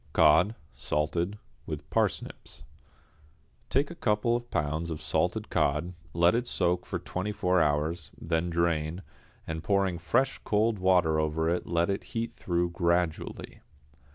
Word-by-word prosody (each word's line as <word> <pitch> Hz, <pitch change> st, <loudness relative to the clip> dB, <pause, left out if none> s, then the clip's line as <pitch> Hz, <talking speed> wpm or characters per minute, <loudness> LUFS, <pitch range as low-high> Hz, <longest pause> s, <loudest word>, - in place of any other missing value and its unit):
=Cod, 105 Hz, +6 st, +5 dB, 0.2 s
Salted, 85 Hz, +6 st, -1 dB, 0.3 s
with -, -, -5 dB
Parsnips.= -, -, -2 dB, 1.1 s
Take 140 Hz, +5 st, +1 dB
a -, -, -8 dB
couple 115 Hz, -3 st, +1 dB
of 120 Hz, 0 st, -4 dB
pounds 80 Hz, +3 st, -1 dB
of 80 Hz, -2 st, -4 dB
salted 75 Hz, -2 st, -1 dB
cod, 75 Hz, +5 st, +1 dB, 0.2 s
let 85 Hz, +4 st, +4 dB
it 120 Hz, +1 st, 0 dB
soak 90 Hz, 0 st, 0 dB
for -, -, -2 dB
twenty 95 Hz, +3 st, -4 dB
four 90 Hz, -3 st, +2 dB
hours, 75 Hz, +1 st, 0 dB
then 80 Hz, +1 st, -1 dB
drain, 85 Hz, 0 st, 0 dB, 0.4 s
and 80 Hz, 0 st, -4 dB
pouring 95 Hz, -4 st, +1 dB
fresh 85 Hz, -, +1 dB
cold 110 Hz, 0 st, +1 dB
water 90 Hz, -4 st, +3 dB
over 80 Hz, +1 st, 0 dB
it 90 Hz, +1 st, -1 dB
let 85 Hz, +2 st, +1 dB
it 100 Hz, -, -3 dB
heat 115 Hz, 0 st, -1 dB
through 85 Hz, -1 st, -1 dB
gradually. 85 Hz, -1 st, -1 dB
85 Hz, 140 wpm, -29 LUFS, 80-100 Hz, 1.1 s, =Cod